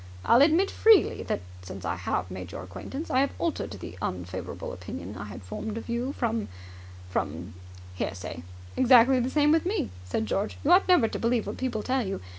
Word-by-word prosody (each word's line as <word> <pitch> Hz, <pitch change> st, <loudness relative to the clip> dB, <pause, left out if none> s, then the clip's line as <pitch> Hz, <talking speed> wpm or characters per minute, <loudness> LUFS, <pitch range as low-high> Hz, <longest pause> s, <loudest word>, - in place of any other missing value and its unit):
I'll 240 Hz, -, +6 dB
admit 330 Hz, +7 st, +4 dB
freely 440 Hz, -3 st, +5 dB
that, -, -, -2 dB, 0.2 s
since 95 Hz, 0 st, -8 dB
I -, -, 0 dB
have 90 Hz, +2 st, -2 dB
made 90 Hz, -1 st, -7 dB
your -, -, -6 dB
acquaintance, 95 Hz, -, -7 dB
I 255 Hz, -, +3 dB
have 275 Hz, +1 st, +1 dB
altered 335 Hz, -2 st, -2 dB
the 95 Hz, -2 st, -9 dB
unfavourable 90 Hz, 0 st, -5 dB
opinion 90 Hz, +2 st, -7 dB
I 100 Hz, -, -6 dB
had 105 Hz, -1 st, -9 dB
formed 210 Hz, -, -5 dB
of 230 Hz, -, -7 dB
you 240 Hz, +3 st, -1 dB
from 230 Hz, -4 st, -1 dB, 0.6 s
from 85 Hz, +3 st, -3 dB, 0.4 s
hearsay.. 90 Hz, -2 st, -4 dB, 0.2 s
." 90 Hz, 0 st, -17 dB
"Exactly 255 Hz, 0 st, +6 dB
the 250 Hz, +1 st, 0 dB
same 295 Hz, +1 st, +3 dB
with 325 Hz, 0 st, +4 dB
me," 370 Hz, -, -1 dB
said 95 Hz, +4 st, -2 dB
George. 200 Hz, -, -2 dB
"You 305 Hz, -, +3 dB
ought 365 Hz, +2 st, +6 dB
never 360 Hz, -11 st, +5 dB
to -, -, -4 dB
believe 230 Hz, -1 st, +1 dB
what -, -, -5 dB
people 245 Hz, -5 st, -2 dB
tell 260 Hz, 0 st, +1 dB
you. 195 Hz, -2 st, -3 dB
220 Hz, 200 wpm, -27 LUFS, -, 0.6 s, I'll